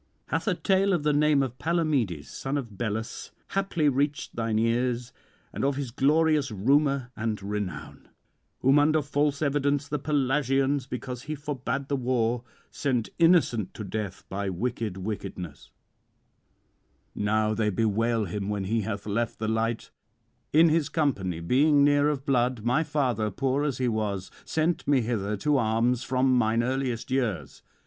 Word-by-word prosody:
Hath - - -1
a - - +2
tale 195 0 +2
of 170 -4 0
the 150 0 +2
name 145 -1 +3
of 130 -1 -5
Palamedes, 145 - 0
son 135 +2 -3
of 115 -7 -6
Belus, 110 +2 -4 0.2
haply 195 -6 0
reached 145 +2 0
thine 115 -2 -1
ears, 120 +2 0 0.4
and - - -3
of 140 0 +1
his 135 -3 -4
glorious 150 +2 +2
rumour 135 +4 +1
and 110 -1 -2
renown; 105 -2 -5 0.5
whom 135 +3 +5
under 155 +1 +3
false 145 +1 0
evidence 145 0 +1
the 150 0 -2
Pelasgians, 135 -1 +1
because 125 -1 -5
he 155 +4 -5
forbade 140 -1 -3
the 140 - 0
war, 125 -2 0 0.3
sent 125 -6 -1
innocent 165 - +3
to 110 - -6
death 100 -1 -5
by 100 +1 -3
wicked 110 +1 -3
witness; 95 -5 -6 1.4
now 110 +1 +1
they 110 0 +1
bewail 110 +2 +1
him 100 +2 -4
when 105 -2 -2
he 110 +4 0
hath 100 0 -4
left 110 +2 -1
the 110 - -3
light; 115 +1 -1 0.6
in 160 +2 +6
his 155 -1 +1
company, 100 - 0
being 140 - +4
near 145 0 +4
of 140 -2 -3
blood, 125 -4 +1
my 125 +7 +2
father, 130 -8 0
poor 135 +6 0
as 145 -4 -1
he 130 - 0
was, 105 -4 -2
sent 160 +2 0
me 140 -3 +4
hither 105 -3 -2
to 145 +8 +2
arms 115 +1 +1
from 130 0 +2
mine 115 -1 +2
earliest 130 -1 -2
years. 105 - -2
125 Hz, 155 wpm, -27 LUFS, 110-145 Hz, 1.4 s, in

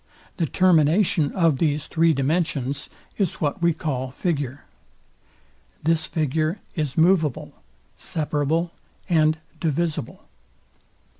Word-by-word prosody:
The 165 - 0
termination 165 -1 +3
of 165 -7 +2
these 150 -2 +1
three 165 0 +3
dimensions 140 -1 -1 0.3
is 195 -5 +1
what 150 +4 -2
we 170 0 +4
call 140 -5 -3
figure. 145 -2 -3 1.2
This 160 0 +1
figure 155 +3 -1
is 150 -6 -3
moveable, 160 -4 +2 0.4
separable, 160 -1 -1 0.4
and 155 -2 +3 0.2
divisible. 160 -4 -2
155 Hz, 95 wpm, -23 LUFS, 145-170 Hz, 1.2 s, we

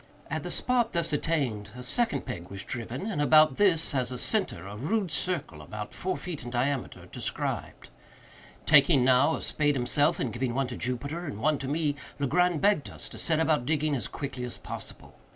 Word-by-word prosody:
At - - -1
the - - -6
spot 245 -2 +1
thus 170 -3 0
attained 135 -10 -1
a 125 - -7
second 145 - 0
peg 85 +1 -6
was 100 0 -5
driven, 120 - -4
and 205 -9 -1
about 155 -1 +5
this, 175 -7 +3
as 130 -2 0
a 125 - -4
centre, 185 - 0
a 100 +1 -7
rude 180 - -1
circle, 170 - -1
about 105 +8 -7
four 185 0 -2
feet 175 -5 -6
in 120 - -6
diameter, 130 +2 -2
described. - - -4 0.7
Taking 145 -3 +6
now 130 +5 +4
a - - -6
spade 145 -1 +2
himself, 145 +6 +2
and 120 -5 -2
giving 120 0 -2
one 135 0 +1
to 125 - -5
Jupiter 140 +9 -3
and 145 - -5
one 150 +3 +1
to 135 - -4
me, 150 0 0 0.2
Legrand 170 +4 +2
begged 200 -7 +2
us - - -7
to - - -8
set 160 -2 +2
about 155 -6 +1
digging 155 -1 +1
as 125 - -2
quickly 135 -3 -5
as 125 - -4
possible. - - -7
145 Hz, 195 wpm, -28 LUFS, 125-165 Hz, 0.7 s, Taking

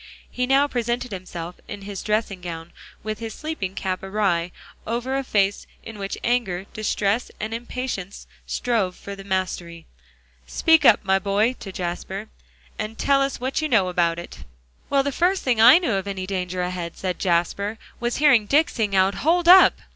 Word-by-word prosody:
He 250 0 -1
now 275 +2 +4
presented 240 -1 -2
himself 180 -2 -7
in 205 -1 -8
his 200 -1 -6
dressing 210 -3 -1
gown, 165 -1 -7 0.3
with 215 0 -4
his 225 -1 -6
sleeping 305 -12 -4
cap 185 -1 -3
awry, 190 -4 0 0.4
over 240 +4 -2
a 275 - -1
face 200 -5 0 0.2
in 225 -2 -9
which 195 0 -4
anger, 225 -7 0
distress 215 +1 0
and 215 +1 -4
impatience 235 -5 -5 0.2
strove 215 -7 0
for 200 - -8
the 195 - -10
mastery. 180 -3 -3 0.6
"Speak 320 -3 +3
up, 215 -4 +6
my 190 0 +3
boy," 205 +5 +1
to 195 - -7
Jasper, 190 +3 -5 0.5
"and 215 +1 -4
tell 275 -1 +3
us 275 -1 -1
what 260 +4 -1
you 310 - -1
know 200 -7 +3
about 170 -2 +1
it." 170 - -9 0.5
"Well, 275 -1 +3
the 280 - -1
first 360 +6 +1
thing 240 -4 +2
I 245 +7 +9
knew 340 - 0
of 195 0 -2
any 190 -2 -4
danger 185 -1 -3
ahead," 180 -2 -4
said 185 -2 -3
Jasper, 190 +4 0 0.2
"was 240 0 -1
hearing 265 -8 +4
Dick 305 +6 +4
sing 210 -4 -1
out 190 +1 +4
'Hold 340 +3 +2
up!' 370 +2 +9
205 Hz, 175 wpm, -23 LUFS, 185-250 Hz, 0.6 s, I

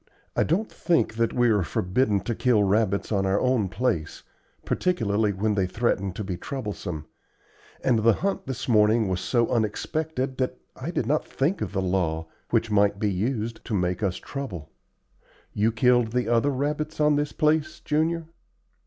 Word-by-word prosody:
I - - +2
don't 195 +8 0
think 170 -9 +1
that 115 -1 +2
we 120 -1 +3
are 105 -2 +3
forbidden 100 +5 +1
to 115 - -2
kill 115 -2 +3
rabbits 100 0 +1
on 95 -2 +1
our 95 +2 +2
own 125 -6 +1
place, 95 -6 -2 0.4
particularly 110 - +1
when 105 +2 0
they 95 -2 +1
threaten 100 -2 0
to 105 - -5
be 95 -3 -4
troublesome; 100 - -5 0.8
and 120 -4 +3
the 115 +1 +5
hunt 195 - -2
this 130 -1 -4
morning 110 -1 +4
was 90 -1 -1
so 120 -2 +1
unexpected 130 +5 -1
that 130 -1 -1 0.2
I 130 +5 -5
did 165 - -1
not 150 +5 0
think 160 +8 -1
of 95 - -2
the 95 -2 0
law, 85 -4 0 0.2
which 115 - +1
might 100 -1 +3
be 105 0 0
used 110 +3 -2
to 110 - -2
make 90 0 0
us 95 -4 0
trouble. 100 - -6 0.8
You 110 +2 +2
killed 120 0 +3
the 125 0 0
other 120 +4 +3
rabbits 150 +3 -2
on 150 -1 +4
this 145 0 0
place, 155 0 +1
Junior?" 160 +2 0
115 Hz, 170 wpm, -25 LUFS, 100-135 Hz, 0.8 s, the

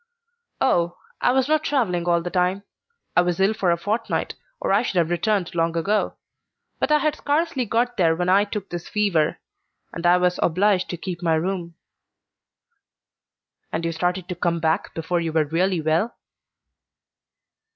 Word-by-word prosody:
"Oh, 175 -8 +1 0.2
I - - +3
was 265 0 +2
not 310 0 +2
travelling 205 - 0
all 170 -1 +2
the 175 - -4
time. 185 +2 +1 0.5
I - - +6
was 175 0 -1
ill 195 +3 +3
for 195 -4 0
a 170 - +3
fortnight 215 +6 -2 0.3
or - - 0
I - - +4
should 245 - -3
have 170 -1 +2
returned 195 0 0
long 165 0 0
ago; 205 +6 0 0.6
but - - 0
I 300 - +6
had 300 +1 0
scarcely 295 -3 0
got 245 +3 0
there 165 -4 +3
when 180 +1 -1
I 195 +3 +4
took 205 -1 -6
this 175 -1 -6
fever, 195 -8 +1 0.6
and 170 +1 -1
I 175 +1 +6
was 180 0 +1
obliged 185 +2 +2
to 175 - -4
keep 175 0 -6
my 165 -2 +2
room." 170 0 -3 2.0
"And 165 +1 -2
you 165 - 0
started 175 +2 -1
to 180 - -3
come 170 -1 0
back 160 +3 0
before 165 +2 -1
you 165 -1 -2
were 155 -1 +2
really 175 +3 0
well?" 160 +9 0
180 Hz, 170 wpm, -23 LUFS, 170-210 Hz, 2.0 s, I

